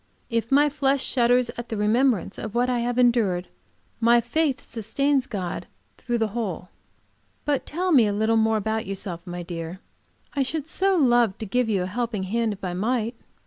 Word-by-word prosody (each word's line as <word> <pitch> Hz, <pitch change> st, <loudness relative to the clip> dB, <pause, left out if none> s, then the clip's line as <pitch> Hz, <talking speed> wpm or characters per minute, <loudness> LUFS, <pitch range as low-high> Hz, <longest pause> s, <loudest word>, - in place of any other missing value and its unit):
If 230 Hz, +1 st, -1 dB
my 290 Hz, +2 st, +5 dB
flesh 275 Hz, -1 st, +1 dB
shudders 245 Hz, -1 st, +2 dB
at 240 Hz, -, -6 dB
the 220 Hz, -, -3 dB
remembrance 215 Hz, -1 st, +1 dB
of 220 Hz, 0 st, -6 dB
what 245 Hz, +1 st, +2 dB
I 245 Hz, -, +1 dB
have 240 Hz, +1 st, -1 dB
endured, 230 Hz, -8 st, +2 dB, 0.5 s
my 235 Hz, +1 st, +5 dB
faith 270 Hz, +4 st, 0 dB
sustains 265 Hz, +4 st, -1 dB
God 185 Hz, -6 st, -4 dB, 0.3 s
through 240 Hz, -1 st, -1 dB
the 225 Hz, -1 st, 0 dB
whole. 200 Hz, -5 st, -4 dB, 0.8 s
But 290 Hz, -2 st, 0 dB
tell 360 Hz, +4 st, -1 dB
me 250 Hz, -8 st, +6 dB
a -, -, 0 dB
little 220 Hz, +2 st, +1 dB
more 220 Hz, 0 st, +3 dB
about 220 Hz, 0 st, -2 dB
yourself, 190 Hz, -3 st, -4 dB
my 175 Hz, 0 st, -5 dB
dear. 170 Hz, +1 st, -6 dB, 0.5 s
I 280 Hz, -, 0 dB
should 295 Hz, +3 st, -2 dB
so 385 Hz, +3 st, +1 dB
love 240 Hz, -, +3 dB
to 220 Hz, -, -5 dB
give 245 Hz, +3 st, 0 dB
you 195 Hz, -4 st, +1 dB
a -, -, -2 dB
helping 225 Hz, 0 st, -2 dB
hand, 225 Hz, +3 st, 0 dB
if 205 Hz, 0 st, -8 dB
I 180 Hz, -2 st, -2 dB
might." 225 Hz, +4 st, 0 dB
230 Hz, 185 wpm, -24 LUFS, 205-250 Hz, 0.8 s, me